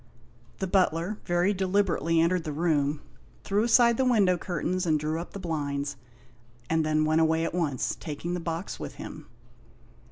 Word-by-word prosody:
The 190 - -2
butler 185 +1 +1
very 175 +3 +2
deliberately 185 -4 +1
entered 170 +1 +2
the 155 - -4
room, 150 -2 0 0.4
threw 200 +1 +1
aside 235 0 +5
the 265 - +2
window 210 -8 +4
curtains 180 +1 -2
and 155 -2 +3
drew 155 +2 -2
up 175 - -10
the 200 - -6
blinds, 145 -4 -3 0.8
and 160 -1 +2
then 155 0 +2
went 155 +1 +3
away 160 +1 +2
at 165 - -3
once, 155 -8 -1
taking 165 +3 -5
the 180 - -2
box 165 +2 -4
with - - -7
him. - - -9
170 Hz, 165 wpm, -27 LUFS, 155-185 Hz, 0.8 s, aside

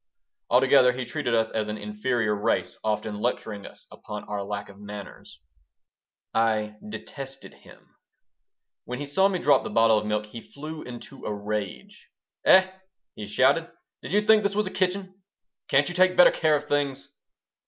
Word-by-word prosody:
Altogether 130 0 +5
he 125 0 -4
treated 130 -6 -1
us 110 0 +1
as 110 -1 -2
an 105 0 -4
inferior 105 +2 -1
race, 105 +3 0
often 105 -1 -2
lecturing 110 -4 -3
us - - -13
upon 105 0 -8
our 105 -1 -4
lack 100 +1 -5
of 100 0 -15
manners 100 -7 -10 0.9
I 110 -2 +1
detested 135 +5 -9
him - - -19 0.9
When 125 - -5
he 145 - -4
saw 190 +8 +3
me 195 -2 -1
drop 145 -4 +4
the - - -5
bottle 115 -1 +4
of 105 - -6
milk 105 0 -1
he 115 +2 -9
flew 155 +5 -9
into 125 +2 -10
a - - -2
rage 105 - -5 0.4
"Eh!" 190 0 +7 0.5
he 105 - -8
shouted, 140 +10 +2 0.3
"did - - -8
you 205 +2 +3
think 215 0 +5
this 200 -1 -1
was 210 0 +1
a 190 - -5
kitchen? 190 +1 -2 0.5
Can't 140 +2 +3
you 175 - -3
take 185 0 +3
better 180 - +8
care 155 -2 +2
of 145 - -2
things?" 140 -1 -2
125 Hz, 170 wpm, -26 LUFS, 105-155 Hz, 0.9 s, better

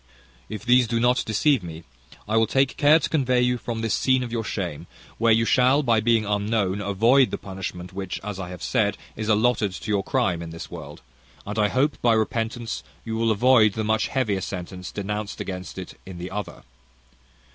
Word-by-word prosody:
If 110 +2 -7
these 125 0 +5
do 115 0 0
not 125 +2 +3
deceive 125 +4 +2
me, 85 -1 -8 0.4
I 110 - 0
will 115 0 +4
take 135 +3 +1
care 150 +2 +6
to - - -1
convey 130 -5 +1
you 125 0 +1
from 115 -1 -4
this 115 -1 0
scene 130 -1 +2
of 120 - -6
your 115 -1 -2
shame, 90 -9 -4 0.3
where 115 0 +4
you 115 +1 +4
shall, 130 +5 +4
by 115 -4 +3
being 115 0 +2
unknown, 105 -1 0
avoid 115 +7 +3
the - - -3
punishment 95 -2 -7
which, 95 -1 -4
as 100 -1 -5
I 90 -2 -5
have 90 -2 -8
said, 105 -5 +1 0.2
is 110 0 -4
allotted 110 -2 +2
to 105 - -5
your 100 -1 +1
crime 85 -3 0
in 85 - -6
this 80 0 -9
world; 75 -4 -9 0.4
and 105 +2 -4
I 105 - +4
hope, 130 +8 0
by 120 -1 +4
repentance, 115 +1 -1 0.2
you 110 -1 -3
will 115 0 +1
avoid 110 -1 +4
the 110 - -2
much 110 +1 +1
heavier 110 -8 -1
sentence 90 0 -6
denounced 105 +1 -4
against 90 -1 -6
it 95 - -8
in 95 -2 -9
the 90 +1 -6
other. 105 +1 -6
110 Hz, 200 wpm, -24 LUFS, 95-120 Hz, 0.4 s, care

